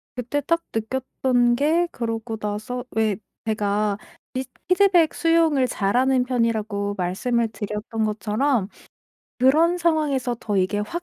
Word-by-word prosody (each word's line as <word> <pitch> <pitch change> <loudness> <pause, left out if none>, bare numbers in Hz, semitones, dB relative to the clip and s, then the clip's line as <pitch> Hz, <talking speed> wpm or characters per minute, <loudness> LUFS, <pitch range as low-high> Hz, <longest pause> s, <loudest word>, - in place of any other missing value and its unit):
그때 250 +4 -2
딱 335 +4 +1
느꼈던 245 +1 +1
게 315 +6 +2
그러고 225 -1 -4
나서 215 +4 -4
왜 220 -2 +1 0.3
제가 210 -1 0 0.4
비스 260 0 -3 0.2
피드백 365 -3 +4
수용을 330 -5 +3
잘하는 250 +5 +2
편이라고 220 -5 -1
말씀을 225 +6 0
드렸던 215 +1 -4
것처럼 215 +1 0 0.7
그런 310 +7 +4
상황에서 300 -7 +1
더 205 -2 -2
이게 190 +2 +1
확 270 +12 -3
240 Hz, 265 characters per minute, -23 LUFS, 210-280 Hz, 0.7 s, 피드백